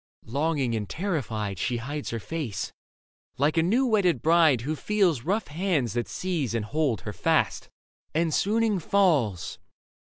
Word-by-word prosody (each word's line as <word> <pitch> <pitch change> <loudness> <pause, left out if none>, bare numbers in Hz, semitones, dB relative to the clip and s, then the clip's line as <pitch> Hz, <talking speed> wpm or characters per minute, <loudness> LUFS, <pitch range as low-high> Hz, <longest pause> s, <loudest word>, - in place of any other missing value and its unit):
Longing 140 0 0
and 105 -2 -3
terrified, 115 - -2
She 120 -1 0
hides 145 +5 -4
her 115 - -3
face, 140 - -4 0.6
like 145 +4 +2
a 165 - +4
new 225 +11 +2
wedded 195 - +2
bride 160 -6 +5
Who 150 +6 -2
feels 180 - +1
rough 195 - -1
hands 150 - 0
that 120 -1 -1
seize 165 -11 -2
and 110 -2 -1
hold 135 - 0
her 105 +1 -6
fast; - - +1 0.4
And 165 0 0
swooning 215 +1 +2
falls. 150 - +1
150 Hz, 150 wpm, -26 LUFS, 120-180 Hz, 0.6 s, bride